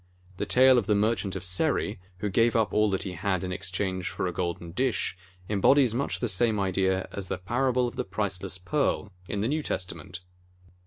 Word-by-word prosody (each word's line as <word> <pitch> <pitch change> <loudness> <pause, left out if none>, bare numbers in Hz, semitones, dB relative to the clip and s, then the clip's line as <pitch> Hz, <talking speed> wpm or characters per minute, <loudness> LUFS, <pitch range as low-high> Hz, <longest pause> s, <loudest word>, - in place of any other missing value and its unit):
The - - -2
tale 130 0 +6
of 105 - -5
the 105 - +3
Merchant 100 -2 0
of 95 - -4
Seri, 100 - 0 0.2
who 105 - 0
gave 115 +4 +3
up 110 -2 +2
all 105 0 +3
that 95 -1 0
he 95 - -4
had 95 0 -1
in 90 - -3
exchange 90 +1 -2
for - - -3
a 90 - -2
golden 85 -1 -3
dish, 125 0 0 0.3
embodies 120 +5 +4
much 135 +4 -1
the 120 - +1
same 110 +1 +2
idea 95 -1 +1
as 100 -2 -5
the 95 - -2
parable 125 +6 +1
of 120 - -8
the - - 0
priceless 95 -1 -2
Pearl, 110 +1 -1 0.2
in 100 - -2
the 110 - +1
New 155 +4 0
Testament. 90 -5 -5
100 Hz, 200 wpm, -27 LUFS, 95-115 Hz, 0.3 s, tale